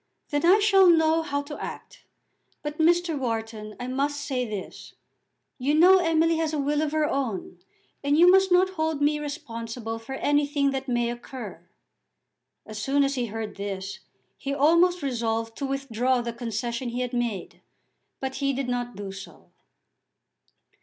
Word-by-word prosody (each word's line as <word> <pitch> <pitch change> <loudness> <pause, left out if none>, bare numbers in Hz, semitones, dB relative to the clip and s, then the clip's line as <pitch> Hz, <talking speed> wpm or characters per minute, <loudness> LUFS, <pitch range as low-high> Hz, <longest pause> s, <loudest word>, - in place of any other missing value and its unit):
Then 290 0 -1
I 360 +4 +7
shall 390 -3 +5
know 320 -1 +4
how 285 -3 -2
to 295 +1 -7
act. - - -9 0.6
But, 295 +1 -5
Mr. 340 0 +3
Wharton, 225 -4 -4
I 245 - -4
must 280 +3 -1
say 260 -3 -2
this, 205 -3 -7 0.6
you 280 +4 +1
know 365 +4 +7
Emily 330 -1 +2
has 320 -1 -1
a - - 0
will 290 +1 0
of 310 -1 -1
her 310 0 +1
own, 230 -11 -3 0.4
and 285 +1 +2
you 345 +2 +7
must 385 0 +4
not 370 +1 +4
hold 315 -4 -1
me 295 +1 +2
responsible 230 -6 -5
for 235 +4 -7
anything 285 0 +1
that 270 0 -4
may 240 -1 0
occur." 240 -7 -9 1.0
As 215 -1 -7
soon 280 +5 +2
as 275 0 +1
he 250 -3 -1
heard 220 -1 -6
this 195 0 -5 0.4
he 275 0 -3
almost 335 +4 +4
resolved 225 -3 -2
to 275 - -2
withdraw 260 -2 0
the 235 -1 -4
concession 235 +1 -3
he 245 +1 -3
had 250 0 -3
made; 235 -6 -3 0.6
but 265 0 -4
he 275 -1 0
did 270 0 -2
not 245 -1 -3
do 200 -1 -6
so. 195 0 -12
275 Hz, 165 wpm, -26 LUFS, 235-305 Hz, 1.0 s, I